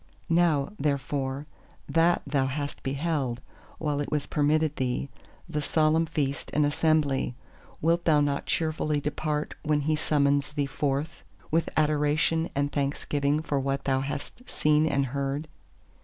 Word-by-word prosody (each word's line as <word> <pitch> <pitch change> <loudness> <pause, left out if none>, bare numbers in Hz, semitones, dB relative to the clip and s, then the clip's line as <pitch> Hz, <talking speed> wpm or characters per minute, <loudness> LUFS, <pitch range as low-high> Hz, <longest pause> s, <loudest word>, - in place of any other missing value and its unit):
Now 165 -4 +3
therefore 140 -1 -1 0.4
that 165 +1 +3
thou 140 -2 +1
hast 145 +2 -4
beheld, 135 -3 -1 0.4
while 150 -2 -1
it 145 - -4
was 150 -2 0
permitted 150 +1 +1
thee, 130 +2 -1 0.4
the 150 -3 -2
Solemn 160 +2 +2
Feast 145 -3 -2
and 150 0 +4
Assembly, 145 -4 +1 0.5
wilt 170 +2 +2
thou 155 -3 +5
not 145 -1 0
cheerfully 155 -2 0
depart, 150 +1 -2
when 150 -1 +1
He 155 +2 +1
summons 145 -1 +1
thee 145 -2 0
forth, 140 +2 -2 0.3
with 165 +1 +2
adoration 155 +2 +2
and 140 +1 0
thanksgiving 145 +1 0
for 145 -3 0
what 135 0 -1
thou 135 -1 +1
hast 145 - -6
seen 150 +1 +3
and 140 -3 +1
heard? 140 +3 -2
145 Hz, 140 wpm, -27 LUFS, 140-155 Hz, 0.5 s, thou